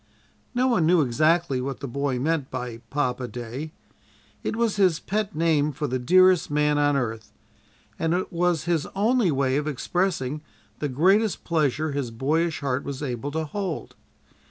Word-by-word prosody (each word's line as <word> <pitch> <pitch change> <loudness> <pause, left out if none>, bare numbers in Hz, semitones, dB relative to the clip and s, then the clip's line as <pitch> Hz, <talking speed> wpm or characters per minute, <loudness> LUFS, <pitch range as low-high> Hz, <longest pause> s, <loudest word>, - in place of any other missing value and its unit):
No 255 +1 +3
one 185 -11 +2
knew 175 -1 +5
exactly 155 +2 +2
what 135 0 -4
the 140 - -5
boy 140 +1 -1
meant 145 +1 -1
by 125 -2 -5
papa 130 -3 -1
day. 125 +6 -6 0.7
It - - -2
was 230 -3 0
his 185 -5 +3
pet 210 0 -2
name 155 -2 +2
for 150 +2 -4
the 130 -2 -1
dearest 185 +7 +5
man 150 0 +2
on 145 -1 +3
earth, 115 -4 -3 0.7
and 165 +1 +1
it 185 - -3
was 175 -2 +1
his 170 -3 0
only 220 0 +3
way 135 -2 +1
of 150 +1 -2
expressing 150 -1 -1 0.4
the 145 - -2
greatest 190 - +2
pleasure 155 -2 0
his 140 -3 -2
boyish 155 +8 0
heart 135 -1 -1
was 140 0 -5
able 130 0 -3
to 160 +2 -2
hold. 185 0 -4
150 Hz, 165 wpm, -25 LUFS, 135-175 Hz, 0.7 s, knew